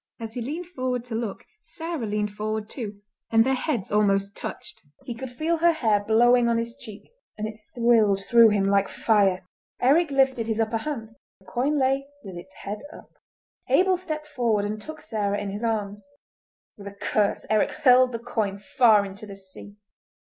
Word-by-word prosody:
As 225 -1 -6
he 245 - -4
leaned 305 +9 -4
forward 255 -7 -3
to 240 - -8
look 225 -3 -4 0.2
Sarah 325 - -5
leaned 210 0 -1
forward 215 0 -3
too, 210 -5 -7 0.3
and 225 0 +5
their 265 +2 +1
heads 250 -5 -2
almost 200 -1 +2
touched. - - -7 0.2
He 240 - -5
could 260 +3 -7
feel 315 +7 -1
her 340 +1 +4
hair 220 -9 +1
blowing 235 +3 +4
on 230 - +2
his 230 +1 -3
cheek, 215 - -12 0.3
and 215 0 -3
it 220 0 -9 0.2
thrilled 220 -5 +3
through 235 -2 +7
him 205 -2 +1
like 200 0 +3
fire. 195 -4 +2 0.3
Eric 300 +6 +4
lifted 265 -4 +2
his 220 -1 -1
upper 225 0 +1
hand; 225 -3 -5 0.3
the 190 - -25
coin 250 +10 0
lay 270 0 +1 0.2
with 190 -3 -9
its 180 +2 -11
head 205 +1 -4
up. - - -14 0.6
Abel 375 0 +4
stepped 315 -4 -5
forward 230 -8 0
and 210 +1 -4
took 310 +4 -9
Sarah 205 -8 -2
in 205 -1 -4
his 205 +3 -6
arms. 210 -3 -2 0.8
With 200 - -9
a 200 - -9
curse 205 -2 0
Eric 215 -1 +2
hurled 255 -1 +4
the 230 - -3
coin 220 -4 -2
far 215 0 +4
into 200 +2 -9
the 200 - -9
sea. 195 +1 -11
225 Hz, 185 wpm, -25 LUFS, 205-255 Hz, 0.8 s, through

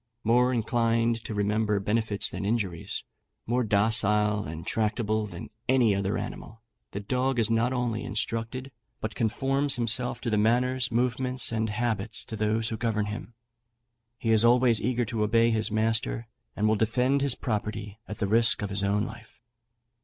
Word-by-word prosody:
More 125 +3 +3
inclined 115 -1 +1
to 110 - -5
remember 105 0 +1
benefits 105 +1 0
than - - -5
injuries; 100 -5 -2 0.4
more 125 +2 +1
docile 105 0 +3
and 80 +2 -7
tractable 110 0 0
than 85 -4 -9 0.2
any 125 -5 +4
other 100 0 -1
animal, 115 +1 -7 0.3
the 100 - -5
dog 125 +5 -1
is 115 -1 +2
not 115 +2 +2
only 120 -4 -1
instructed, 115 +5 -3 0.3
but 110 0 -4
conforms 135 +7 +1
himself 125 +1 0
to 120 - -2
the 105 - +2
manners, 125 +3 +1
movements, 125 +1 +1
and 110 -1 -1
habits 110 -1 -2
of 110 - -5
those 110 +1 0
who 110 - -4
govern 110 -2 0
him. 105 +2 -7 0.8
He 115 -2 -1
is 110 0 +4
always 120 -1 +4
eager 120 +1 0
to 110 0 -3
obey 115 +2 +3
his 110 0 0
master, 115 +2 0 0.3
and 105 - +1
will 110 - +3
defend 125 +6 +1
his 140 -3 +3
property 105 -2 -4
at 105 - -6
the 105 - -1
risk 115 +3 +3
of 100 - -3
his 100 0 +1
own 100 +1 +1
life." 110 -1 -11
115 Hz, 165 wpm, -27 LUFS, 105-120 Hz, 0.8 s, any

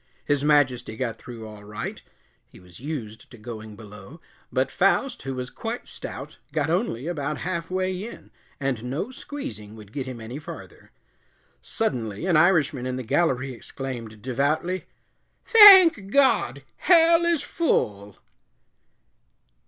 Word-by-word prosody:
His 145 -1 +1
Majesty 130 -7 +2
got 115 -3 -3
through 115 -3 -9
all 105 -1 -12
right 105 +1 -6 0.5
he - - -17
was 90 -2 -16
used 120 -6 -7
to 120 - -14
going 110 -1 -9
below 105 - -12 0.3
but 130 0 0
Faust, 235 +7 +1
who 135 0 -5
was 125 0 -5
quite 230 +2 -6
stout, - - -8
got 160 - -1
only 170 - -1
about 150 -3 -3
half 170 -2 -3
way 185 +1 -2
in, - - -12 0.3
and 135 -5 -2
no 145 - -3
squeezing 275 - -7
would 105 -1 -14
get 135 -2 -4
him 125 -2 -7
any 115 +5 -7
farther. 155 - -11 0.7
Suddenly 125 - -3
an 180 -3 +2
Irishman 155 -6 +3
in 130 - -3
the 130 - -4
gallery 130 0 0
exclaimed, 115 -4 -8
devoutly, 145 +8 -1 0.6
"Thank 380 - +9
God, 275 +3 +2
hell 335 -1 +5
is 335 -4 +1
full." 105 - -1
135 Hz, 135 wpm, -24 LUFS, 115-185 Hz, 0.7 s, Thank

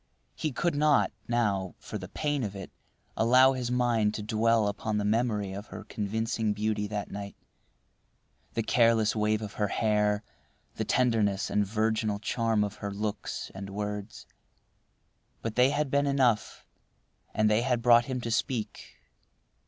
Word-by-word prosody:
He 155 - -3
could 170 +6 0
not, 150 -1 +3 0.2
now, 100 -6 0
for 105 - -7
the 90 -1 -8
pain 145 +2 -1
of 100 -2 -4
it, 95 -1 -8 0.4
allow 130 +4 +5
his 125 -2 -3
mind 120 -4 +1
to 105 - -4
dwell 110 0 +2
upon 105 +1 -2
the 105 - -1
memory 105 -3 0
of 100 +3 -7
her - - -8
convincing 110 +1 -2
beauty 105 0 -1
that 105 -1 -4
night—the 100 +2 -10
careless 115 -2 +3
wave 110 0 +1
of 105 - -6
her 105 - 0
hair, 105 0 +1 0.5
the - - -3
tenderness 110 -5 +1
and 105 -1 +1
virginal 110 0 0
charm 110 0 0
of 105 0 -4
her 100 - -4
looks 105 +1 -4
and 95 +1 -7
words. 105 +1 -5 1.2
But 115 - -2
they 125 +3 +4
had 145 -1 -1
been 140 0 +2
enough, 130 -6 +1 0.7
and 110 - +2
they 105 +1 +3
had 120 -2 0
brought 120 0 +6
him 130 -3 -3
to 115 - -4
speak. 115 -1 -3
110 Hz, 150 wpm, -28 LUFS, 105-120 Hz, 1.2 s, brought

